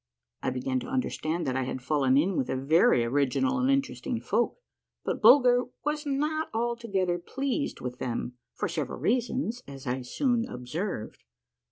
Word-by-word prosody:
I - - 0
began 130 0 -1
to - - -7
understand 175 -10 -1
that 130 -2 -1
I 130 - +1
had 130 - -3
fallen 135 0 +2
in 180 +6 +2
with 130 - -1
a - - 0
very 135 -3 +4
original 145 - +1
and 260 +1 +2
interesting 265 -3 0
folk, 240 - 0 0.5
but - - -2
Bulger 250 -2 +7 0.2
was 300 0 -1
not 300 +3 0
altogether 225 -7 0
pleased 275 - -2
with 125 0 -5
them, 120 0 -3 0.2
for - - -1
several - - -3
reasons, 245 0 0
as 135 -1 -9
I 125 +1 -1
soon 240 - 0
observed. 125 - -5
185 Hz, 160 wpm, -28 LUFS, -, 0.5 s, Bulger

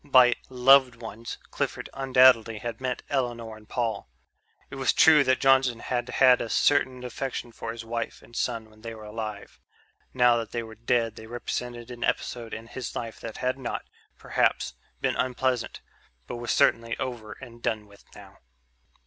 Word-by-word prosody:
By 130 -4 +6 0.2
"loved 130 0 +6
ones" 115 0 -7
Clifford - - -3
undoubtedly 130 -4 +5
had 115 +2 -6
meant 130 -1 -2
Elinor 120 -5 -2
and 110 0 -17
Paul. 115 - -2 0.6
It 135 - -7
was 135 -1 +2
true 155 -2 +7
that 130 -1 +2
Johnson 135 -3 +4
had 120 0 -2
had 130 -2 +5
a 115 - -4
certain 130 -2 +2
affection 125 0 -4
for 115 - -6
his 115 0 -8
wife 115 0 -4
and 120 - -16
son 115 -3 -2
when 110 0 -20
they 115 0 -7
were 110 - -11
alive; 105 -1 -7 0.5
now 125 -2 +4
that 115 -1 -5
they 120 - -2
were 110 0 -10
dead 115 0 0
they 110 - -10
represented 120 0 -5
an 120 -1 -6
episode 120 -2 -2
in 110 - -6
his 125 +1 -7
life 115 -1 -5
that 115 -2 -7
had 130 +1 -1
not, 125 - -4 0.3
perhaps, - - 0 0.3
been - - +1
unpleasant, 130 -1 -1 0.4
but 120 - -6
was 120 -1 -6
certainly 115 0 +2
over 120 -4 -5
and 120 -3 -13
done 110 -2 -1
with 100 0 -19
now. - - -14
120 Hz, 175 wpm, -27 LUFS, 115-130 Hz, 0.6 s, true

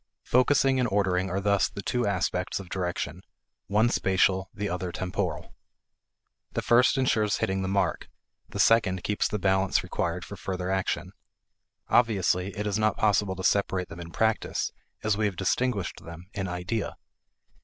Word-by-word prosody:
Focusing 130 +1 +3
and 125 -2 +1
ordering 95 -2 +1
are 95 +2 -1
thus 100 0 +2
the 100 - -7
two 125 -3 0
aspects 90 -2 -1
of 95 -3 -9
direction, 90 -2 -3 0.5
one 105 +4 +3
spatial, 95 -3 +2
the 105 0 -3
other 90 -1 -3
temporal. 90 -2 -3 1.0
The - - -2
first 120 +2 +4
insures 110 -6 +2
hitting 95 0 -1
the 95 - -2
mark; 100 +1 0 0.4
the - - -7
second 95 -6 +3
keeps 105 - 0
the 105 - -2
balance 95 -1 +2
required 85 +1 -2
for 100 - -8
further 95 -1 -3
action. 95 -1 -1 0.8
Obviously, 100 -5 +2
it 105 - -2
is 105 0 0
not 110 -1 +2
possible 105 -2 +2
to 95 - -6
separate 95 -3 +1
them 85 - -9
in 85 -1 -7
practice 110 +5 0 0.3
as 110 -2 +1
we 110 - +1
have 100 - -4
distinguished 100 +2 -1
them 85 +1 -10
in 95 -2 -3
idea. 90 +5 -3
95 Hz, 160 wpm, -27 LUFS, 90-105 Hz, 1.0 s, first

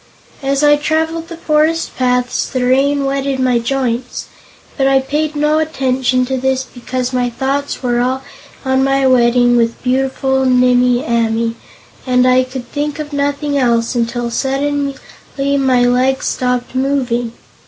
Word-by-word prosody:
As 275 +1 0
I 295 0 +5
traveled 320 +2 -1
the 335 -1 -9
forest 315 +1 0
paths 250 -1 0
the 255 -2 -2
rain 275 +2 +2
wetted 275 0 -1
my 250 -2 +2
joints, 245 0 -3 0.5
but 270 -2 +1
I 270 0 +4
paid 300 +3 -2
no 300 +1 +2
attention 260 -4 0
to 265 +1 -2
this 265 0 0
because 255 0 -5
my 250 -1 0
thoughts 270 +3 -3
were 240 -1 +1
all 260 +2 -1 0.4
on 265 0 +2
my 270 0 +2
wedding 245 -1 +4
with 230 -1 0
beautiful 265 +1 0
Nimmie 250 -1 +3
Amee 230 0 0 0.5
and 250 0 +3
I 255 0 +4
could 255 -1 -7
think 295 0 -3
of 300 -1 -6
nothing 285 0 -1
else 235 -2 +1
until 235 0 -2
suddenly 280 +2 -1 0.4
my 275 -3 +2
legs 255 +2 +1
stopped 250 -1 -1
moving. 255 -3 -1
265 Hz, 145 wpm, -16 LUFS, 250-280 Hz, 0.5 s, I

